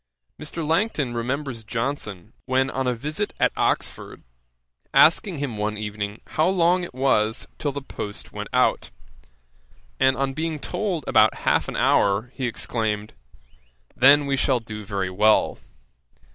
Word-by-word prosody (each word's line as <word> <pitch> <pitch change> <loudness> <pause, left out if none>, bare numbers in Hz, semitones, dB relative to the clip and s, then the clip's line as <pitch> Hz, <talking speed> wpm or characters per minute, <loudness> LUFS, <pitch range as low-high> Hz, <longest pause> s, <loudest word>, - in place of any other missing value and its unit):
Mr. 155 +1 -3
Langton 160 - 0
remembers 125 0 -3
Johnson, 110 -4 -3
when 130 +1 +1
on 130 -1 -2
a 125 - +1
visit 150 - -3
at - - +3
Oxford, - - -1 0.7
asking 170 +3 +5
him 135 -6 -4
one 105 +1 -2
evening 105 0 -5
how 155 - +1
long 180 -1 +2
it 170 - -8
was 115 -5 +1
till 145 - -1
the 140 0 -6
post 105 -6 -8
went - - -6
out; - - +2 1.1
and 130 0 +3
on 135 0 -1
being 160 +2 -2
told 180 +1 -3
about 110 -1 +4
half - - +2
an - - -5
hour, 100 +5 +2
he 130 -3 -2
exclaimed, 110 -2 -2 0.8
'then 140 +3 +6
we 140 -1 0
shall 130 -1 +2
do 110 -2 -8
very 100 -2 -3
well.' 105 +3 +3
130 Hz, 145 wpm, -23 LUFS, 110-150 Hz, 1.1 s, then